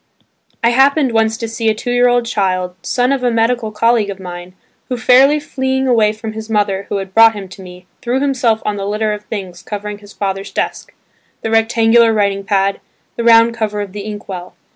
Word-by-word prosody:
I 235 Hz, -, +4 dB
happened 270 Hz, +2 st, +3 dB
once 225 Hz, 0 st, +1 dB
to 230 Hz, -, -4 dB
see 225 Hz, 0 st, -1 dB
a 215 Hz, -, +1 dB
two 245 Hz, +3 st, -4 dB
year 245 Hz, 0 st, +3 dB
old 245 Hz, -1 st, +1 dB
child, 185 Hz, -5 st, -1 dB
son 250 Hz, +1 st, 0 dB
of 275 Hz, -2 st, 0 dB
a 245 Hz, -, +3 dB
medical 230 Hz, -1 st, 0 dB
colleague 225 Hz, -1 st, +1 dB
of 195 Hz, -1 st, -6 dB
mine, 180 Hz, 0 st, -9 dB, 0.3 s
who, 250 Hz, -, -2 dB
fairly 265 Hz, +5 st, +5 dB
fleeing 265 Hz, -2 st, -2 dB
away 225 Hz, -4 st, +3 dB
from 220 Hz, 0 st, -7 dB
his 220 Hz, 0 st, -8 dB
mother 200 Hz, -2 st, 0 dB
who 205 Hz, -, -1 dB
had 190 Hz, -1 st, -6 dB
brought 225 Hz, 0 st, +6 dB
him 200 Hz, -2 st, -7 dB
to 195 Hz, -, -12 dB
me, 180 Hz, 0 st, -12 dB, 0.2 s
threw 250 Hz, +2 st, -1 dB
himself 255 Hz, -5 st, 0 dB
on 210 Hz, -1 st, -1 dB
the 195 Hz, 0 st, -4 dB
litter 210 Hz, +1 st, -1 dB
of 210 Hz, 0 st, -8 dB
things 190 Hz, -5 st, -6 dB
covering 210 Hz, 0 st, -6 dB
his 205 Hz, 0 st, -15 dB
father's 195 Hz, -1 st, -4 dB
desk, -, -, -3 dB, 0.5 s
the 225 Hz, -, -2 dB
rectangular 225 Hz, +1 st, +4 dB
writing 200 Hz, -2 st, 0 dB
pad, 195 Hz, -1 st, 0 dB, 0.4 s
the 235 Hz, -, -3 dB
round 230 Hz, 0 st, +5 dB
cover 215 Hz, -2 st, -3 dB
of 205 Hz, -2 st, -5 dB
the 205 Hz, +1 st, -6 dB
ink 205 Hz, 0 st, -7 dB
well. 180 Hz, -2 st, -7 dB
220 Hz, 210 wpm, -16 LUFS, 200-235 Hz, 0.5 s, brought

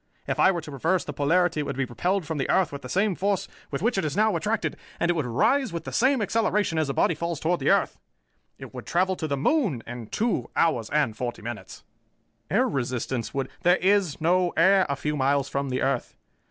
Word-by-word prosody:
If -, -, -2 dB
I -, -, +6 dB
were 175 Hz, -3 st, -3 dB
to 150 Hz, -, -10 dB
reverse 165 Hz, +7 st, 0 dB
the 145 Hz, -, -5 dB
polarity, 165 Hz, +4 st, +2 dB
it -, -, 0 dB
would 135 Hz, -, -4 dB
be 135 Hz, -, 0 dB
repelled 180 Hz, -, -1 dB
from 155 Hz, -1 st, -3 dB
the 135 Hz, -, -2 dB
earth 190 Hz, -4 st, +2 dB
with 140 Hz, -, -7 dB
the 125 Hz, -, -9 dB
same 195 Hz, -, +1 dB
force 195 Hz, +1 st, -1 dB, 0.2 s
with 140 Hz, +5 st, -4 dB
which 235 Hz, -3 st, +2 dB
it -, -, -1 dB
is 150 Hz, +1 st, -2 dB
now 215 Hz, 0 st, +3 dB
attracted, 220 Hz, +1 st, -1 dB, 0.2 s
and 170 Hz, -, +2 dB
it -, -, +1 dB
would 155 Hz, -6 st, -2 dB
rise 255 Hz, -, +2 dB
with 170 Hz, -1 st, -4 dB
the -, -, -7 dB
same 260 Hz, -2 st, +2 dB
acceleration 210 Hz, -5 st, +1 dB
as 155 Hz, -3 st, 0 dB
a -, -, -1 dB
body -, -, +3 dB
falls 170 Hz, 0 st, -3 dB
toward 170 Hz, +2 st, 0 dB
the -, -, +1 dB
earth. -, -, +2 dB, 0.6 s
It -, -, -10 dB
would -, -, -8 dB
travel 185 Hz, +2 st, +1 dB
to 160 Hz, -, -4 dB
the 140 Hz, -2 st, -1 dB
moon 175 Hz, -, +1 dB
in 120 Hz, -1 st, -7 dB
two 220 Hz, -, -1 dB
hours 125 Hz, -10 st, +1 dB
and 145 Hz, -7 st, +1 dB
forty 120 Hz, -1 st, -5 dB
minutes." 120 Hz, 0 st, -8 dB, 0.7 s
"Air -, -, +2 dB
resistance 125 Hz, -2 st, -2 dB
would 135 Hz, -1 st, -1 dB
" -, -, -35 dB
"There 175 Hz, +1 st, +5 dB
is 190 Hz, -4 st, +2 dB
no 175 Hz, +2 st, +2 dB
air 190 Hz, +3 st, +5 dB
a 140 Hz, -, 0 dB
few 150 Hz, +2 st, -2 dB
miles 140 Hz, 0 st, +1 dB
from 140 Hz, 0 st, -2 dB
the 130 Hz, 0 st, -1 dB
earth. 135 Hz, -2 st, -1 dB
160 Hz, 235 wpm, -25 LUFS, 135-190 Hz, 0.7 s, I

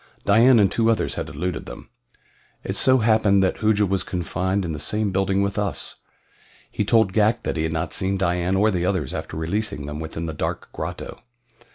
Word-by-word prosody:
Dian 115 Hz, +5 st, +6 dB
and 100 Hz, -4 st, +4 dB
two 115 Hz, -1 st, +2 dB
others 115 Hz, -, +1 dB
had -, -, -4 dB
eluded 90 Hz, +1 st, -4 dB
them. -, -, -10 dB, 0.7 s
It -, -, -4 dB
so 130 Hz, 0 st, +5 dB
happened 110 Hz, -4 st, +3 dB
that 95 Hz, -, 0 dB
Hooja 105 Hz, -2 st, +2 dB
was 95 Hz, -1 st, 0 dB
confined 95 Hz, +2 st, -2 dB
in 85 Hz, -, -3 dB
the 75 Hz, -, -5 dB
same 105 Hz, +6 st, -1 dB
building 95 Hz, +1 st, +1 dB
with 100 Hz, +1 st, -2 dB
us. 100 Hz, -2 st, -3 dB, 0.7 s
He -, -, -1 dB
told 110 Hz, -2 st, +3 dB
Ghak 110 Hz, +2 st, +2 dB
that -, -, -2 dB
he 80 Hz, -, -1 dB
had 80 Hz, 0 st, -1 dB
not 80 Hz, 0 st, -2 dB
seen 95 Hz, +1 st, 0 dB
Dian 90 Hz, 0 st, 0 dB
or 105 Hz, +3 st, +3 dB
the 90 Hz, -3 st, -1 dB
others 90 Hz, -8 st, -1 dB
after -, -, -5 dB
releasing 80 Hz, -2 st, -2 dB
them 75 Hz, +1 st, -6 dB
within 80 Hz, +1 st, -5 dB
the 80 Hz, -, -4 dB
dark -, -, -4 dB
grotto. -, -, -6 dB
95 Hz, 200 wpm, -23 LUFS, 85-105 Hz, 0.7 s, Dian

